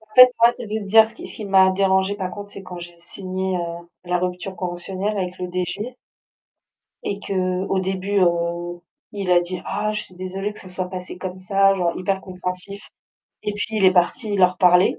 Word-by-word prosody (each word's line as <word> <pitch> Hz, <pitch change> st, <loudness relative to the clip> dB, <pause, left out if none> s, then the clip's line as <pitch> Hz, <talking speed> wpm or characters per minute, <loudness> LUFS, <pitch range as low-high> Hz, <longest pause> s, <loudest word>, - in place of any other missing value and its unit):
En 220 Hz, -, -23 dB
fait 255 Hz, 0 st, +10 dB
moi, 235 Hz, +1 st, +6 dB
je -, -, -5 dB
vais 215 Hz, +1 st, -3 dB
te 200 Hz, -, -7 dB
dire 220 Hz, +3 st, +7 dB
ce 220 Hz, -, -10 dB
qui -, -, -9 dB
ce -, -, -8 dB
qui 215 Hz, -, -6 dB
m'a 190 Hz, -1 st, +6 dB
dérangée, 190 Hz, +1 st, +2 dB
par 185 Hz, -2 st, -3 dB
contre, 205 Hz, +2 st, -8 dB
c'est 200 Hz, -, -9 dB
quand 180 Hz, -1 st, -8 dB
j'ai 175 Hz, 0 st, -10 dB
signé, 185 Hz, +1 st, -3 dB
heu, 170 Hz, 0 st, -5 dB, 0.2 s
la 180 Hz, 0 st, +1 dB
rupture 180 Hz, +1 st, -3 dB
conventionnelle 185 Hz, +3 st, -3 dB
avec 180 Hz, -1 st, -3 dB
le 180 Hz, -, -3 dB
DG 185 Hz, +7 st, -3 dB, 1.1 s
et 200 Hz, -, -3 dB
qu'au 185 Hz, 0 st, 0 dB
début, 190 Hz, +2 st, 0 dB
heu, 175 Hz, 0 st, 0 dB, 0.3 s
il 195 Hz, -3 st, -3 dB
a 175 Hz, -1 st, +6 dB
dit: 175 Hz, +1 st, -4 dB
«Ah 210 Hz, +2 st, -1 dB
je 210 Hz, -, -1 dB
suis 185 Hz, -, -13 dB
désolé 190 Hz, +3 st, -4 dB
que -, -, -11 dB
ça 185 Hz, -, -11 dB
se 180 Hz, -, -9 dB
soit 185 Hz, -1 st, -2 dB
passé 180 Hz, -1 st, -7 dB
comme 185 Hz, 0 st, -5 dB
ça», 195 Hz, +1 st, +3 dB
genre, 175 Hz, -3 st, +1 dB
hyper 190 Hz, +1 st, -1 dB
compréhensif. 185 Hz, +2 st, -4 dB, 0.6 s
Et 210 Hz, -, -1 dB
puis 205 Hz, -, -2 dB
il 195 Hz, -, +4 dB
est 185 Hz, -, +7 dB
parti 190 Hz, +4 st, +1 dB
leur 180 Hz, -1 st, +4 dB
parler 180 Hz, 0 st, +5 dB
185 Hz, 215 wpm, -22 LUFS, 180-200 Hz, 1.1 s, fait